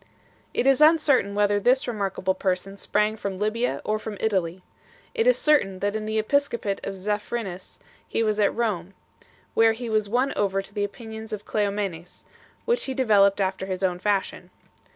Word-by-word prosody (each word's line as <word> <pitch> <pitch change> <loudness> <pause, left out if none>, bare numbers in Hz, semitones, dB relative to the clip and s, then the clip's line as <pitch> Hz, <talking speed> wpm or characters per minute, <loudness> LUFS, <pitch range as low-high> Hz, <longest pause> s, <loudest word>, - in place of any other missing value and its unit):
It - - -1
is 270 +1 +4
uncertain 300 -10 +4
whether 205 0 +2
this 255 +5 +2
remarkable 195 -4 -1
person 190 +1 -2
sprang 210 +2 0
from 200 -3 -4
Libya 215 +4 -1
or 215 0 0
from 215 -1 -6
Italy. 185 -4 -1 0.5
It 455 +1 +1
is - - +5
certain 290 -11 +2
that 205 +2 -1
in 215 0 -3
the 220 0 -1
episcopate 225 -3 0
of 195 - -4
Zephyrinus 205 -1 -4 0.3
he 230 - 0
was 215 -1 0
at 205 - +3
Rome, 195 -5 -2 0.6
where 225 0 +5
he 235 0 -6
was 215 -2 +1
won 255 +5 +1
over 195 -1 +1
to 195 +1 -7
the 205 -1 -1
opinions 220 +1 -7
of 210 -1 -5
Cleomenes, 200 -5 -3 0.4
which 475 +1 +1
he 265 - -3
developed 205 -6 +4
after 190 -1 -1
his 185 0 -4
own 180 -1 0
fashion. 200 0 -1
210 Hz, 175 wpm, -25 LUFS, 195-230 Hz, 0.6 s, is